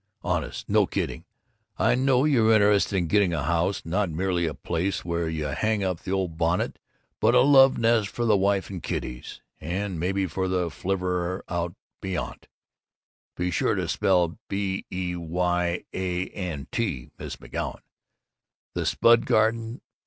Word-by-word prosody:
Honest! - - -2
No - - +3
kidding! - - -3 0.5
I - - +3
know 130 +1 +3
you're 120 -7 +4
interested 105 -2 +4
in 90 - +1
getting 95 +1 +2
a 75 - -2
house, 85 +5 0
not 95 +3 0
merely 85 +1 0
a 80 - -4
place 90 +3 -2
where 85 -1 -1
you 80 -1 -3
hang 110 +4 0
up 90 -3 -1
the - - -6
old 90 -4 -2
bonnet 85 +1 0 0.4
but 115 +3 +4
a 125 - +7
love 135 0 +6
nest 115 -2 +3
for 120 +3 -3
the 110 -2 +4
wife 100 0 +1
and 90 -3 -6
kiddies 60 0 -5 0.2
and 90 +2 -3
maybe 95 +3 0
for 95 +2 -2
the 90 -2 0
flivver 90 -1 -2
out 85 0 -2 0.3
beyant 95 -2 -4 0.9
(be 90 0 -1
sure - - +1
and - - -1
spell 90 -3 +3
that 80 - -13
b 100 -1 -2
e 90 -1 -2
y 90 +1 -1
a 90 -1 -2
n 85 -7 -5
t, 85 - -2
Miss - - -6
McGoun) - - -5 1.0
the - - -2
spud 115 0 +4
garden. 115 +2 +1
95 Hz, 160 wpm, -26 LUFS, 85-105 Hz, 1.0 s, a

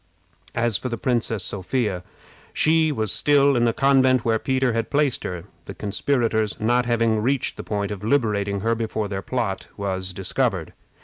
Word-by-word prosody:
As 115 -3 +1
for 130 - -4
the 120 - -3
Princess 115 -5 0
Sophia, 100 0 -2 0.5
she 160 0 +3
was 110 -7 -1
still 140 -1 +4
in 120 -1 +3
the 115 - +3
convent 130 -2 +3
where 115 -1 +2
Peter 130 -1 0
had 115 0 -2
placed 145 -3 +1
her, 90 -2 -5 0.2
the - - -8
conspirators 110 0 -1
not 120 +2 +1
having 115 -2 +2
reached 130 +3 0
the - - -7
point 100 -1 -3
of 105 -1 -6
liberating 105 -5 0
her 115 +2 +1
before 110 -2 -2
their 95 -1 -4
plot 115 -4 -3
was 95 -2 -3
discovered. 95 0 -2
115 Hz, 170 wpm, -23 LUFS, 100-130 Hz, 0.5 s, still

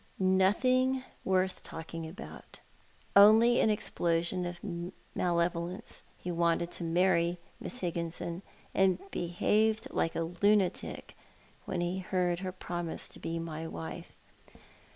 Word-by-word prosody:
" - - -30
Nothing 255 +8 +3 0.2
worth 185 0 +1
talking 165 0 -7
about— 165 +4 -10 0.6
only 220 +4 +8
an - - +4
explosion 175 -4 0
of 175 0 -6
male 175 -1 -1
volence. 175 +5 -6 0.2
He 180 - -5
wanted 170 0 +1
to - - -3
marry 170 0 +2 0.2
Miss 250 - -6
Higginson, 170 0 -3 0.3
and 190 -2 +4
behaved 215 +6 +1
like 165 - 0
a - - 0
lunatic 190 +3 +1 0.5
when 175 - -2
he 175 +2 -1
heard 180 -2 0
lier 185 -1 -3
promise 175 -2 -5
to - - -11
be 165 0 -3
my 165 -1 -4
wife." 80 - -7
175 Hz, 125 wpm, -31 LUFS, 170-190 Hz, 0.6 s, only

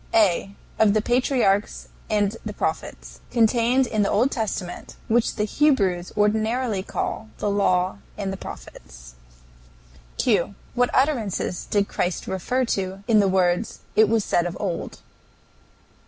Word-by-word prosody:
A. 200 -2 +2 0.2
Of 215 -1 +4
the 215 - +3
patriarchs 240 -5 +1 0.2
and 210 -1 +1
the - - -5
prophets, - - -4
contained 235 +3 +3
in 215 -3 -1
the 200 - +2
Old 240 +7 +2
Testament, 205 -6 -4
which 230 +1 +2
the 210 - 0
Hebrews 205 -8 +1
ordinarily 220 +1 +1
call 220 +3 -4
the 205 - -1
Law 185 -2 +1 0.2
and 195 -2 -3
the - - -3
Prophets. - - -11 1.0
Q. - - +1 0.2
What 245 0 +2
utterances 235 - 0
did 200 -1 +1
Christ 175 0 -2
refer 245 +8 -1
to 195 -3 -3
in 220 -2 +5
the 200 - +4
words, 185 +2 +1
"It 220 -1 +5
was 225 -2 +1
said 175 0 +1
of 175 - -6
old"? 185 -5 -3
210 Hz, 140 wpm, -23 LUFS, 190-230 Hz, 1.0 s, in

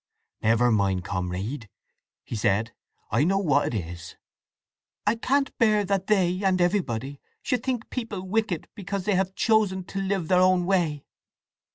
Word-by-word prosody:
"Never 115 +2 +3
mind, 100 -4 +1
comrade!" 95 +6 -4 0.5
he - - -6
said. 110 +1 0 0.4
"I - - +3
know 190 +5 +2
what 145 -7 +2
it 95 -6 -2
is!" 85 0 -9 0.9
"I 210 - +4
can't 270 +4 0
bear 215 -3 +3
that 195 -1 -1
they, 185 -3 +2
and 190 -1 +2
everybody, 145 - 0 0.2
should 250 -4 0
think 250 -3 -2
people 225 -7 -4
wicked 195 -3 -1
because 195 -1 -4
they 210 - +1
may 190 - +3
have 190 0 -1
chosen 210 -4 +2
to 195 +2 -5
live 190 -3 -1
their 180 +1 +4
own 185 -1 +4
way! 170 -6 0
185 Hz, 160 wpm, -26 LUFS, 120-200 Hz, 0.9 s, I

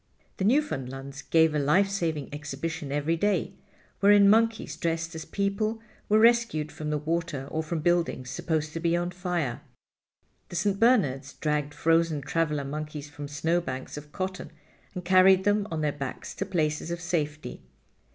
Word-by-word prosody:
The 190 - -1
Newfoundlands 140 - -1
gave 160 0 +3
a 150 - +1
life 150 +8 +3
saving 165 -7 -2
exhibition 145 0 -5
every 145 +3 0
day, 205 +5 0 0.5
wherein 200 0 +6
monkeys 225 -7 +2
dressed 165 +1 -2
as 160 -1 -6
people 205 +3 -1 0.3
were 215 - +5
rescued 230 -9 +3
from 155 -1 -5
the 150 - 0
water 160 -2 -2
or 160 - -1
from 160 0 -3
buildings 165 -6 0
supposed 155 +2 -2
to 165 - -3
be 170 0 +1
on 175 +1 -2
fire. 175 -8 -2 0.9
The - - -8
St. 195 +2 0
Bernards 140 - +2
dragged 150 -1 -2
frozen 165 0 +2
traveler 150 -2 -1
monkeys 150 0 -6
from 145 -1 -7
snowbanks 150 -2 -2
of 150 0 -9
cotton 185 +1 -4 0.5
and 180 -1 -5
carried 185 +1 +6
them 205 0 +2
on 160 -2 -3
their 150 -1 +1
backs 140 -2 -6
to 195 - -3
places 155 -4 -1
of 170 0 -3
safety. 155 -4 -3
165 Hz, 160 wpm, -27 LUFS, 150-185 Hz, 0.9 s, wherein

